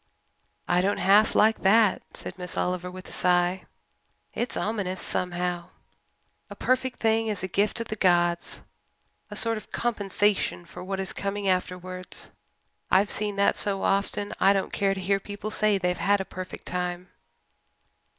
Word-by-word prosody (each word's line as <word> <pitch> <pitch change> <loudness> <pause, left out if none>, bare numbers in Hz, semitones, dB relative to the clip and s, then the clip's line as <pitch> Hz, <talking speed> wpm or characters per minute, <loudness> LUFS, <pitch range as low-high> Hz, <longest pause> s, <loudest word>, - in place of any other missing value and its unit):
"I 175 0 +3
don't 200 +2 +1
half 205 +3 +4
like 220 +1 +4
that," 210 +1 +4 0.2
said - - -5
Miss 180 -2 -4
Oliver, 180 0 -1
with 185 0 -10
a - - -12
sigh. 180 +1 +2 0.7
"It's 240 - -2
ominous 195 -4 -2
somehow. 180 -1 -2 0.8
A - - -8
perfect 255 0 0
thing 225 0 +2
is 210 -4 -2
a - - -1
gift 205 +5 0
of 230 - -6
the 215 - -2
gods 175 -3 +1 0.7
a 210 - -7
sort 225 +1 +3
of 215 - -11
compensation 205 -5 0
for 175 +1 -10
what 190 +1 -3
is 190 - -2
coming 200 0 -3
afterwards. 185 0 -2 0.6
I've 195 +2 +4
seen 210 -1 -2
that 200 0 +3
so 195 -2 0
often 200 +1 0
that - - -8
I 195 +1 +6
don't 195 -1 -2
care 195 -1 +1
to - - -5
hear 195 +1 +1
people 205 +2 -6
say 215 -2 +3
they've 180 -1 0
had 205 0 +3
a 190 - -3
perfect 185 -1 -8
time. 180 0 -3
195 Hz, 165 wpm, -26 LUFS, 180-210 Hz, 0.8 s, I